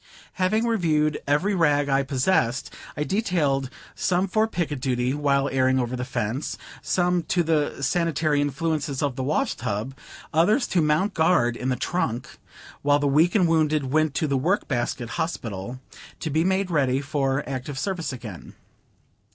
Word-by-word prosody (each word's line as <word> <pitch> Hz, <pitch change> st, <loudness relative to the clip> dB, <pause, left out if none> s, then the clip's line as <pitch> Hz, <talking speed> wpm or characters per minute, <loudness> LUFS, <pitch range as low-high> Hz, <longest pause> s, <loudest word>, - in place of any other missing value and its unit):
Having 215 Hz, +5 st, +2 dB
reviewed 155 Hz, -9 st, +1 dB
every 160 Hz, +9 st, +2 dB
rag 145 Hz, -5 st, +2 dB
I 135 Hz, 0 st, +3 dB
possessed, 130 Hz, -2 st, 0 dB, 0.2 s
I 150 Hz, -, 0 dB
detailed 150 Hz, -, 0 dB, 0.2 s
some 185 Hz, +1 st, +1 dB
for 215 Hz, +3 st, +2 dB
picket 165 Hz, -9 st, -2 dB
duty 125 Hz, -1 st, 0 dB
while 140 Hz, -1 st, +1 dB
airing 130 Hz, 0 st, +2 dB
over 125 Hz, 0 st, -1 dB
the 125 Hz, -, -3 dB
fence; 125 Hz, +1 st, -3 dB, 0.2 s
some 180 Hz, -1 st, +1 dB
to 175 Hz, -, +2 dB
the 150 Hz, -3 st, 0 dB
sanitary 155 Hz, -1 st, +1 dB
influences 145 Hz, 0 st, -1 dB
of 140 Hz, -3 st, -1 dB
the 130 Hz, -, -3 dB
wash 155 Hz, -, 0 dB
tub; 105 Hz, +6 st, -3 dB, 0.4 s
others 210 Hz, -, +3 dB
to 175 Hz, -, +2 dB
mount 155 Hz, +6 st, +1 dB
guard 160 Hz, -8 st, +3 dB
in 125 Hz, +2 st, -3 dB
the 130 Hz, -, +1 dB
trunk; 125 Hz, -3 st, -3 dB, 0.4 s
while 145 Hz, 0 st, +4 dB
the 145 Hz, -, -1 dB
weak 155 Hz, +7 st, +3 dB
and 185 Hz, -5 st, +4 dB
wounded 155 Hz, -4 st, +1 dB
went 155 Hz, -2 st, +2 dB
to -, -, +1 dB
the 140 Hz, -2 st, +1 dB
Work 180 Hz, +9 st, 0 dB
basket 120 Hz, -1 st, -2 dB
Hospital, 120 Hz, -, -4 dB, 0.4 s
to 160 Hz, -, -3 dB
be 160 Hz, +3 st, +2 dB
made 190 Hz, 0 st, 0 dB
ready 135 Hz, -5 st, +2 dB
for 135 Hz, -1 st, -1 dB
active 135 Hz, +1 st, -5 dB
service 180 Hz, 0 st, -2 dB
again. 115 Hz, -8 st, -9 dB
145 Hz, 160 wpm, -24 LUFS, 130-170 Hz, 0.4 s, while